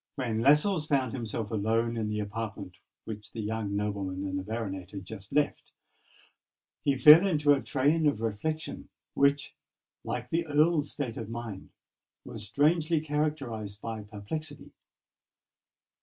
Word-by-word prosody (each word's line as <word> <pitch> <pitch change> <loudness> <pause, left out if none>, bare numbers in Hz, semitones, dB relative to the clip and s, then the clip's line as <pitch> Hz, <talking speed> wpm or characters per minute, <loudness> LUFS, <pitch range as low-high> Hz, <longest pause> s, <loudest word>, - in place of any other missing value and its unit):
When 115 -5 -1
Lascelles 150 - +4
found 135 -5 +1
himself 115 -3 -4
alone 115 +2 +1
in 110 -2 -2
the 105 0 -1
apartment 105 -3 -5 0.3
which 110 -1 -8
the 115 - -6
young 105 -1 -2
nobleman 100 -2 -2
and 95 0 -2
the - - -5
baronet 95 -4 -4
had 100 -2 -8
just 100 0 -9
left, 145 +1 0 1.1
he 140 -1 +2
fell 155 +8 +9
into 150 -5 +4
a 140 - 0
train 150 +4 +2
of 140 -7 +1
reflection 115 +9 -3 0.2
which, 140 +1 +2 0.5
like 125 0 -4
the 165 0 0
Earl's 150 0 +3
state 135 -6 -4
of 110 -2 -5
mind, 115 -4 -6 0.6
was 105 -1 -4
strangely 160 +2 +2
characterised 145 -9 -2
by 110 -1 -5
perplexity. 110 +9 -6
115 Hz, 140 wpm, -29 LUFS, 105-150 Hz, 1.1 s, fell